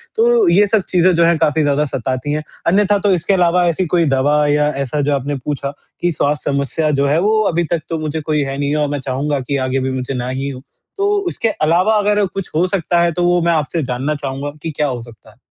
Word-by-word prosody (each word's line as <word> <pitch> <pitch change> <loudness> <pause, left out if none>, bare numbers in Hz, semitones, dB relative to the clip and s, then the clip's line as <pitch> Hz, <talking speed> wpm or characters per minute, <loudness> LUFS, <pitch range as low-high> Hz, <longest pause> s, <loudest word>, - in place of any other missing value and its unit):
तो 460 -2 +3
ये 205 - +4
सब 205 0 +2
चीज़ें 180 0 +3
जो 170 0 +4
हैं 170 -1 +3
काफ़ी 155 0 +1
ज़्यादा 145 +1 +1
सताती 130 +1 -3
हैं। 150 0 -2 0.2
अन्यथा 205 +3 +3
तो 205 0 +1
इसके 180 +2 0
अलावा 180 -1 +3
ऐसी 170 +2 0
कोई 170 -1 +3
दवा 145 +3 +2
या 150 0 +2 0.2
ऐसा 145 +3 -2
जो 145 +1 +1
आपने 140 +1 -3
पूछा 140 -1 -3 0.3
कि 175 - +1
स्वास्थ्य 145 -1 -1
समस्या 140 +3 0
जो 140 - +2
है 150 +3 +2
वो 215 +3 +2
अभी 175 +1 +1
तक 170 -2 0
तो 165 - -2
मुझे 155 0 -3
कोई 150 0 0
है 135 0 -4
नहीं 145 +1 -1
और 150 -1 +1
मैं 145 0 -2
चाहूँगा 140 +2 -2
कि 135 +2 -2
आगे 130 +1 0
भी 130 0 -2
मुझे 130 +1 -3
ना 125 -1 -3
ही 135 +2 -3
हो। 130 -2 -8 0.4
तो 400 +1 +1 0.2
उसके 230 -9 -1
अलावा 180 +4 +2
अगर 205 0 +2
कुछ 195 -1 -6
हो 175 +4 +2
सकता 175 -2 0
है, 170 0 +2
तो 175 +2 -2
वो 175 0 +3
मैं 170 0 +2
आपसे 155 +1 -1
जानना 130 +4 -2
चाहूँगा 140 0 -4
कि 165 - -4
क्या 150 - +1
हो 125 -3 -4
सकता 115 -2 -15
है? 110 - -26
150 Hz, 250 wpm, -17 LUFS, 140-175 Hz, 0.4 s, ये